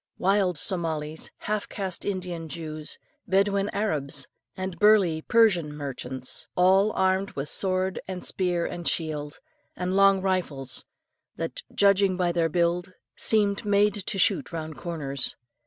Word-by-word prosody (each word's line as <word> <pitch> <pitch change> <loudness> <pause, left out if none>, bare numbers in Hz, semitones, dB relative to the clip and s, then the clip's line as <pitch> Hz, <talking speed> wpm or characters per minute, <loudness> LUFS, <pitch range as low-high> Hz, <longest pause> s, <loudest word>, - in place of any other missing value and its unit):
Wild 190 -2 +2
Somalis, 160 -2 -2
half 210 -1 -2
caste 190 -3 -4
Indian 180 -4 -3
Jews, 155 -2 -5 0.3
Bedouin 195 +1 +2
Arabs, 145 -9 -2 0.3
and 185 -2 -4
burly 200 -7 +5
Persian 195 -8 +3
merchants, 130 -3 -5
all 190 +4 +4
armed 190 +1 +1
with 140 +1 -4
sword 185 0 0
and 185 -1 -5
spear 175 -2 0
and 175 -1 -5
shield, 150 -2 -2 0.4
and 180 +1 -2
long 195 0 +6
rifles 175 -9 0 0.5
that, - - -4
judging 200 -2 +3
by 180 -2 +1
their 170 -1 +1
build, 175 +2 0 0.2
seemed 205 -1 +2
made 205 0 +3
to 195 0 -3
shoot 195 0 +3
round 160 -2 -5
corners. 140 -6 -3
180 Hz, 130 wpm, -26 LUFS, 160-195 Hz, 0.5 s, long